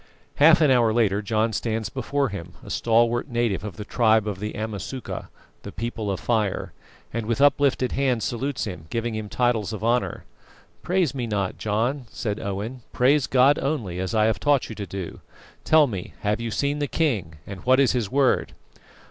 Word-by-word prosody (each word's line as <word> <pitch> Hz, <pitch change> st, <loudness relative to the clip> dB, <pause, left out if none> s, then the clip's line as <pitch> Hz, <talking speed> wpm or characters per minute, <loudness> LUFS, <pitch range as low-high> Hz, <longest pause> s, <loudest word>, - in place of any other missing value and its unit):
Half 160 Hz, +3 st, +7 dB
an 150 Hz, -3 st, +5 dB
hour 120 Hz, -3 st, +4 dB
later 105 Hz, -3 st, +2 dB
John 110 Hz, +1 st, 0 dB
stands 110 Hz, +1 st, -2 dB
before 140 Hz, +1 st, -1 dB
him, 100 Hz, -6 st, -7 dB
a -, -, -9 dB
stalwart 120 Hz, +2 st, +2 dB
native 120 Hz, -6 st, -1 dB
of 105 Hz, -1 st, -7 dB
the 105 Hz, -, -6 dB
tribe 110 Hz, -2 st, +3 dB
of 100 Hz, -3 st, -3 dB
the 105 Hz, +1 st, -4 dB
Amasuka, 110 Hz, +4 st, -5 dB, 0.3 s
the -, -, -8 dB
People 115 Hz, -2 st, -4 dB
of 95 Hz, -3 st, -2 dB
Fire, 105 Hz, 0 st, -1 dB, 0.4 s
and 115 Hz, -2 st, -3 dB
with 115 Hz, +2 st, 0 dB
uplifted 140 Hz, -2 st, +3 dB
hand 130 Hz, -4 st, 0 dB
salutes 135 Hz, +3 st, -2 dB
him, 90 Hz, -6 st, -7 dB
giving 115 Hz, 0 st, -2 dB
him 110 Hz, -1 st, -4 dB
titles 115 Hz, -4 st, 0 dB
of 110 Hz, -1 st, -6 dB
honour. 120 Hz, +2 st, 0 dB, 0.6 s
"Praise 180 Hz, -4 st, +1 dB
me 125 Hz, -4 st, -3 dB
not, 100 Hz, -4 st, -2 dB
John," 120 Hz, +5 st, -1 dB
said 110 Hz, -3 st, -3 dB
Owen; 105 Hz, +6 st, -4 dB
"praise 135 Hz, +2 st, +3 dB
God 135 Hz, +3 st, +4 dB
only, 115 Hz, -, -2 dB
as 95 Hz, +4 st, -2 dB
I 110 Hz, -1 st, +4 dB
have 110 Hz, -, +1 dB
taught 145 Hz, -3 st, +2 dB
you 110 Hz, -, -6 dB
to 100 Hz, -2 st, -5 dB
do. 95 Hz, -3 st, -6 dB, 0.4 s
Tell 155 Hz, -1 st, +5 dB
me, 100 Hz, -9 st, -6 dB
have 105 Hz, +2 st, 0 dB
you 115 Hz, -, -3 dB
seen 140 Hz, +6 st, -1 dB
the 145 Hz, -, 0 dB
king, 115 Hz, -, -1 dB
and 100 Hz, -3 st, -9 dB
what 130 Hz, +1 st, +4 dB
is 135 Hz, -, +4 dB
his 120 Hz, -6 st, -1 dB
word?" 135 Hz, -1 st, +2 dB
115 Hz, 190 wpm, -24 LUFS, 105-130 Hz, 0.6 s, Half